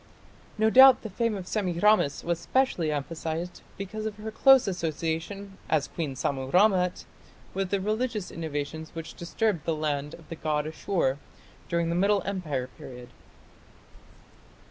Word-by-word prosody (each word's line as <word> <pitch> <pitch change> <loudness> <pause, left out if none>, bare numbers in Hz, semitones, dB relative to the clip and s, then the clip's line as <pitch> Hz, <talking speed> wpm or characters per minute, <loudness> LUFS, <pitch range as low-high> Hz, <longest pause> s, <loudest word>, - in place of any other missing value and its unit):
No 220 +1 +3
doubt 260 +1 +8
the 220 - -6
fame 230 +2 0
of 185 - -7
Semiramis 185 -5 +2
was 170 -1 -1
specially 175 -7 +1
emphasized 160 +4 -4 0.2
because 215 +3 -4
of 215 - -5
her 215 +1 -6
close 270 +2 +6
association, 175 +3 -3
as 155 -3 +2
Queen 150 -6 -4
Sammu 135 0 -2
rammat, 180 -2 +3 0.5
with 195 -1 -2
the 200 - +1
religious 215 0 -2
innovations 160 0 -5
which 165 -1 -6
disturbed 180 0 -1
the 165 - 0
land 150 -1 -2
of 165 - -17
the 165 - -5
god 150 -2 -1
Ashur 155 -4 -1 0.5
during 170 -1 0
the 170 - 0
Middle 200 +1 +2
Empire 155 -10 -2
period. 125 -1 -10
175 Hz, 145 wpm, -27 LUFS, 155-205 Hz, 0.5 s, doubt